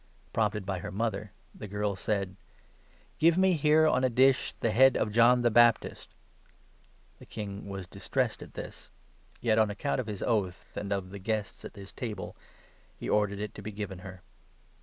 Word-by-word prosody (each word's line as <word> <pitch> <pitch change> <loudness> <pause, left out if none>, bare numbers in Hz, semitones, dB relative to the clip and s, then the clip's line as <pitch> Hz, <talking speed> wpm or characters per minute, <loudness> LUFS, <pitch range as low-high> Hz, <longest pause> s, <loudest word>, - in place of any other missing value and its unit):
Prompted 105 -2 0
by 95 -2 -2
her 100 +3 -6
mother, 105 -1 -2 0.2
the 105 - -8
girl 105 0 -1
said 100 0 -2 0.4
' - - -33
Give 165 +2 +5
me 190 0 +4
here, 155 0 +4
on 130 -4 +3
a 130 - +4
dish, 130 +2 +3
the 115 - -1
head 130 +4 +6
of 105 - 0
John 120 +2 +5
the 120 - +3
Baptist.' 120 0 +3 1.0
The - - -14
king 100 -1 -6
was 95 -1 -5
distressed - - -2
at - - -10
this; - - -8 0.5
yet, 110 -2 +3
on 110 -1 +4
account 130 +7 -2
of 125 - -3
his 105 -3 -4
oath 100 -6 -1
and 100 0 -4
of 95 -2 -2
the 100 - -7
guests 105 0 -3
at - - -9
his 100 -1 -10
table, 110 -7 -6 0.6
he - - -6
ordered 105 -1 +1
it 105 +1 -5
to - - -9
be 105 +2 -6
given 100 -3 -6
her. 95 -1 -10
105 Hz, 185 wpm, -29 LUFS, 100-120 Hz, 1.0 s, head